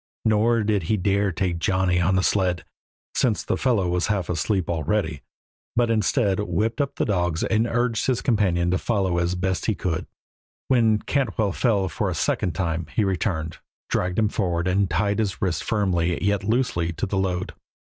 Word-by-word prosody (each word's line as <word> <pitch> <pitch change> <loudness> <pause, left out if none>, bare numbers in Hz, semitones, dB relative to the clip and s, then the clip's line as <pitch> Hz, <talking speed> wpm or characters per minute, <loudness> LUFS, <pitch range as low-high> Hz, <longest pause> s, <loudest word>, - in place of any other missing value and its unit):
Nor 110 +1 +3
did 105 -2 +1
he 110 - +3
dare 100 +1 +1
take 85 0 -1
Johnny 90 0 +1
on 95 +2 +2
the 95 - +2
sled, 95 -3 +1 0.5
since 105 -8 +1
the - - -1
fellow 115 -8 +1
was 90 +1 0
half 100 -4 -1
asleep 90 +2 0
already, 80 -2 -1 0.5
but 120 -1 +2
instead 105 -2 +1
whipped 110 +5 0
up 140 - -2
the - - 0
dogs 90 -5 0
and 115 +1 +1
urged 120 -1 0
his 130 -3 0
companion 90 -7 +2
to 95 - +1
follow 95 -6 0
as 85 +1 0
best 95 0 -1
he 110 - +1
could. 85 -4 -3 0.6
When 115 -4 +4
Cantwell 110 -7 0
fell, 100 -2 +1
for 100 +1 -2
a 90 - -3
second 80 +4 0
time, 80 -1 -2
he 110 - +3
returned, 90 -5 -2 0.3
dragged 90 0 0
him 110 -2 +3
forward, 90 -4 -1
and 95 +1 +2
tied 100 +5 0
his 100 -4 -1
wrists 90 -6 -1
firmly, 90 -5 0
yet 100 -1 +1
loosely, 105 -7 0
to 85 - -2
the 95 0 -1
load. 90 -1 -2
95 Hz, 180 wpm, -24 LUFS, 90-110 Hz, 0.6 s, When